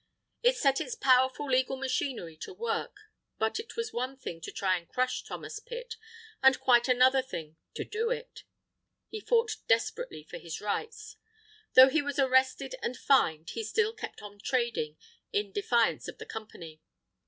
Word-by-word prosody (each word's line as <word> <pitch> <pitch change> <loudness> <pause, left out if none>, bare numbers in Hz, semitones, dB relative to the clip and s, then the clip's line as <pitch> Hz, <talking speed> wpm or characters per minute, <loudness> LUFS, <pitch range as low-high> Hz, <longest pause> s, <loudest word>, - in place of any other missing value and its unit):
It - - +4
set 275 -1 +2
its 480 - -4
powerful 260 - +3
legal 260 0 +2
machinery 260 - -2
to 380 - -8
work. 465 +4 -3 0.4
But 220 - 0
it 445 - -8
was 460 -1 -3
one 255 +3 -3
thing 165 -10 -7
to - - -6
try 185 -2 +1
to 170 - -19
crush 255 0 -1
Thomas 425 - -7
Pitt, 480 0 -7 0.5
and 265 0 +6
quite 240 -1 +4
another 255 +1 +5
thing 160 -11 -7 0.2
to - - -3
do 450 +2 -1
it. - - -5 0.7
He 435 - -5
fought 460 0 +1
desperately 225 -8 0
for 155 - -9
his 165 -1 -6
rights. 210 - -4 0.6
Though 260 +1 +10
he 315 +3 +2
was 285 -1 -4
arrested 260 - +2
and 250 - -3
fined 160 - +2
he 450 - -4
still 440 0 +1
kept - - -8
on 205 0 -10
trading, 235 - -1 0.3
in 205 -1 -1
defiance 230 +4 +1
of - - -8
the - - -8
Company. 170 -8 -9
260 Hz, 165 wpm, -30 LUFS, -, 0.7 s, Though